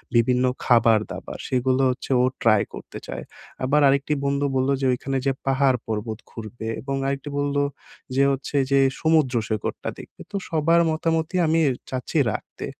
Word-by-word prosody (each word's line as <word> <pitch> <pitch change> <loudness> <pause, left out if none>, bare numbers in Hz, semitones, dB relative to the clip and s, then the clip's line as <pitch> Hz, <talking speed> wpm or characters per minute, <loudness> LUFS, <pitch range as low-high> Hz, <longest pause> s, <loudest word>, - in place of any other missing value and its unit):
বিভিন্ন 125 +2 +3 0.2
খাবারদাবার 115 -3 +2
সেগুলো 130 +1 +1
হচ্ছে 130 +2 -4
ও - - +3 0.2
ট্রাই 110 -3 +4
করতে - - -9
চায় - - -5 0.4
আবার 145 +3 +3
আরেকটি 140 +2 +2
বন্ধু 140 +1 +1
বললো 130 +1 +2
যে 135 - +1
ওইখানে 135 +2 -2
যে 135 - +3 0.2
পাহাড় 135 -1 +3
পর্বত 110 0 -3
ঘুরবে 110 0 -7
এবং 135 0 -3
আরেকটি 140 +1 -3
বললো 145 0 0 0.5
যে 135 - +4
হচ্ছে 135 +1 -4 0.2
যে 140 - +5 0.2
সমুদ্র 155 -5 +3
সৈকতটা 110 -2 -3
দেখবে, - - -13
তো 200 - -6
সবার 165 +1 +3
মতামতই 165 +2 0
আমি 165 +1 +3 0.3
চাচ্ছি 130 +5 -3
রাখতে। - - -6
135 Hz, 155 wpm, -23 LUFS, 125-145 Hz, 0.5 s, যে